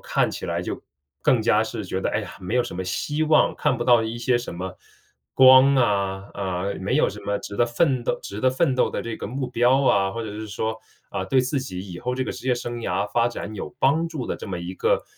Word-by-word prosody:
看 - - +1
起 - - -6
来 - - -2
就 - - -5 0.4
更 125 - +4
加 110 -1 +3
是 110 -1 -5
觉 95 +1 -3
得， - - -1
哎 - - 0
呀， - - -7
没 95 +6 -2
有 125 - +4
什 120 - -7
么 95 - -3
希 145 +11 -2
望， 155 0 +4
看 145 -3 +1
不 120 - -2
到 120 -2 +5
一 110 +1 -4
些 120 +1 +2
什 120 - -4
么 90 +1 -6 0.6
光 130 +1 +8
啊， 100 -5 +1
啊， 95 -2 -3 0.2
没 - - 0
有 - - +3
什 - - -8
么 100 0 -1
值 100 - -8
得 120 - +4
奋 125 +2 +1
斗 - - -1
值 100 +2 -7
得 130 - +3
奋 130 0 +1
斗 130 - +2
的 - - -3
这 115 -1 -5
个 - - -6
目 130 +3 -3
标 125 +2 +3
啊。 95 -5 +3
或 115 +3 -5
者 110 - -5
是 110 +1 -6
说， 110 +2 -2 0.3
啊， 95 -1 -3
对 130 +7 +3
自 130 +2 -1
己 95 -9 -6
以 85 - -8
后 125 0 -2
这 130 - -1
个 - - -3
职 130 - -6
业 125 - +4
生 120 0 -5
涯 105 -3 -1
发 120 0 +3
展 110 -2 -6
有 105 - -6
帮 160 +5 +2
助 150 -7 -5
的 - - -2
这 - - -8
么 90 - -3
一 85 +2 -6
个 - - +1
120 Hz, 280 characters per minute, -24 LUFS, 100-130 Hz, 0.6 s, 光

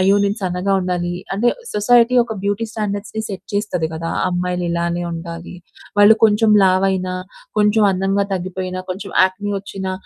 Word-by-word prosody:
"అయ్యో! 195 +2 +4
నేను 200 +2 0
సన్నగా 180 +2 -1
ఉండాలి." 175 -1 -2 0.2
అంటే 235 +5 +2 0.2
సొసైటీ 235 +3 +4
ఒక 225 - -5
బ్యూటీ 205 +3 -1
స్టాండర్డ్స్‌ని 210 0 -3
సెట్ 195 - -7
చేస్తది 180 -6 -1
కదా! 165 +1 -4 0.2
అమ్మాయిలు 180 0 -2
ఇలానే 170 0 -1
ఉండాలి. 170 +1 -7 0.5
వాళ్ళు 210 +2 +7
కొంచెం 215 0 +4
లావైనా, 185 -1 +1 0.4
కొంచెం 210 +1 +3
అందంగా 195 +1 0
తగ్గిపోయినా, 185 0 -4
కొంచెం 190 +2 -5
యాక్నీ 190 +2 -2
వచ్చినా 190 -1 -5
190 Hz, 145 wpm, -19 LUFS, 180-205 Hz, 0.5 s, వాళ్ళు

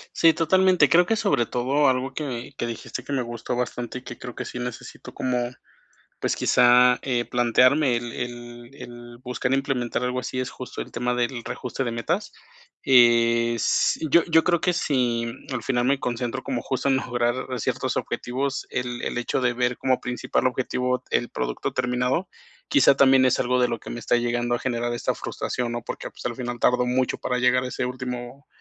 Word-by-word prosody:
Sí, 165 -1 +5
totalmente. 185 +3 +4
Creo 175 +1 +5
que 225 - +2
sobre 200 - +1
todo 135 +5 +1
algo 130 +1 0
que 130 -6 -5
que - - -1
dijiste, 120 +2 -6
que 140 - -6
me 130 - +1
gustó 120 0 -5
bastante 120 0 -3
y - - -13
que 120 -1 -9
creo 125 -1 -8
que - - -5
sí - - -7
necesito 125 0 -7
como, 125 -1 -1 0.7
pues, - - -1
quizá, 125 0 +5
eh, 120 -3 -1
plantearme, 125 +2 +3
el 120 0 -6
el 120 0 -7
el 120 -2 -11
buscar 125 0 -2
implementar 135 -3 -1
algo 125 0 -1
así, 130 - -4
es 130 - -2
justo 130 - -7
el - - -8
tema 125 +1 -1
del 120 0 -2
reajuste 125 +2 -4
de 120 - -2
metas. 170 - -2 0.5
Eh, 120 -2 +5
s - - +1
yo 170 +4 +5
yo 160 -1 +3
creo 175 -3 +2
que, 180 - +2
si 125 -8 0 0.3
al 125 -4 -3
final 120 0 0
me 140 +1 +2
concentro 120 -1 -3
como, 125 -3 -2
justo, 130 +1 -2
en 135 - +4
mejorar 125 0 -1
ciertos - - -1
objetivos, 135 +3 -3
el 125 -1 -3
el - - -3
hecho 120 +2 -1
de 125 -1 +2
ver 125 0 0
como 130 -1 +1
principal 125 +1 -1
objetivo 125 0 -1
el 120 - +1
producto 60 0 -3
terminado, 125 +7 0 0.4
quizá, 290 - +5
también 135 -1 +5
es 130 - +3
algo 125 0 +1
de 125 - +3
lo 115 -1 -3
que - - -9
me 120 - -5
está 120 - +1
llegando 120 0 0
a - - -4
generar 120 -2 -2
esta 120 - -1
frustración, 120 -1 -4
¿no? 120 - -3
Porque, - - -6
pues, - - -13
al 120 -1 -2
final, 120 -1 -4
tardo 125 0 +3
mucho 125 +1 0
para 125 0 -2
llegar 125 +1 +3
a - - -2
ese 125 0 -3
último, 125 +2 -6
125 Hz, 195 wpm, -24 LUFS, 120-130 Hz, 0.7 s, Sí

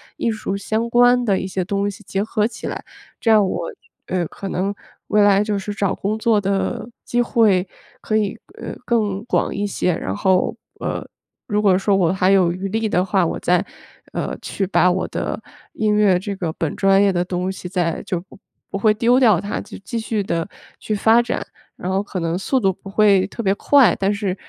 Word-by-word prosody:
艺 230 - 0
术 215 -2 -3
相 220 +3 -2
关 245 +1 +4
的 200 -4 +2
一 - - -3
些 185 -1 -2
东 200 +2 -1
西 200 +2 -13
结 195 +1 -1
合 215 0 0
起 240 - -9
来， - - -5 0.3
这 230 - 0
样 215 -2 +6
我， 180 -2 -2 0.4
呃， 180 -1 -1
可 195 - -8
能 195 +2 -1 0.3
未 210 - +3
来 205 0 +5
就 210 -1 -1
是 205 +2 -5
找 200 -2 0
工 210 +2 -2
作 220 -1 +2
的 195 +2 -1 0.2
机 240 - 0
会 210 -6 +3 0.3
可 215 - -2
以， 210 -2 0 0.2
呃， - - -6
更 210 -4 0
广 - - 0
一 205 +1 -2
些。 180 -2 0
然 95 -11 -3
后， 185 - +2 0.2
呃， - - -3 0.4
如 210 -2 0
果 195 -3 +4
说 200 +1 +1
我 180 -2 +2
还 190 0 +2
有 185 -3 +4
余 190 +2 -4
力 220 +2 0
的 180 -3 +1
话， 190 -1 +1
我 - - -3
再， 180 +1 +2 0.6
呃， - - -3
去 195 - -2
把 180 -1 +3
我 180 +1 0
的 - - -3 0.4
音 215 -1 +1
乐 210 -3 +4
这 200 +3 -4
个 170 -4 -3
本 160 -2 -2
专 195 0 +4
业 200 - +4
的 175 -1 0
东 180 +1 -2
西 190 -1 -7
再 175 -3 -1
就 175 -2 -3
不 190 +1 -18 0.3
不 - - -3
会 210 +1 +3
丢 240 +4 +3
掉 215 -9 +4
它， 205 0 -3
就 - - -9
继 195 +4 -4
续 220 -2 -2
地 165 -3 -2 0.3
去 215 - -2
发 225 +3 +5
展。 240 - -3 0.3
然 185 - -4
后 190 +1 +1
可 200 -2 -5
能 165 0 -1
速 225 +8 0
度 195 -5 +2
不 195 - -12
会 195 -2 +4
特 235 - -6
别 195 -1 +3
快， 270 +4 +4
但 195 +1 +2
是 200 -3 -2
200 Hz, 230 characters per minute, -20 LUFS, 185-215 Hz, 0.6 s, 样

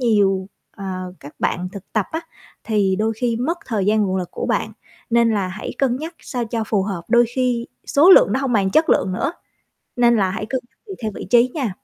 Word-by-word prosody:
nhiều, 200 -5 +2 0.3
ờ, 200 - -8 0.4
các 145 - -11
bạn 180 +1 -1
thực 200 -2 -11
tập 215 -3 +1
á, 320 - -1 0.4
thì 200 -4 +1
đôi 220 +2 0
khi 235 -1 0
mất 325 +9 -1
thời 210 -6 -1
gian 215 +1 +3
nguồn 190 -1 0
lực 180 -2 -3
của - - -4
bạn, - - -1 0.4
nên 235 -1 +4
là 200 -4 0
hãy 200 +4 -6
cân 255 -3 +2
nhắc 320 +4 -6
sao 245 -3 -3
cho 225 0 -2
phù 205 -4 +1
hợp. 190 -4 -4
Đôi 240 0 +5
khi 250 -2 0 0.2
số 320 +7 +5
lượng - - +7
nó 265 - +1
hông 265 -3 -1
bằng 195 -3 +2
chất 315 +7 +3
lượng 185 - +2
nữa, 275 - -1 0.6
nên 240 -1 +4
là 190 -2 +2
hãy 215 +1 -4
cân 260 +2 -2
nhắc - - -42
tùy 390 - -6
theo 215 - -1
vị - - -6
trí 240 +1 +5
nha. 265 - -1
225 Hz, 235 wpm, -21 LUFS, 195-250 Hz, 0.6 s, lượng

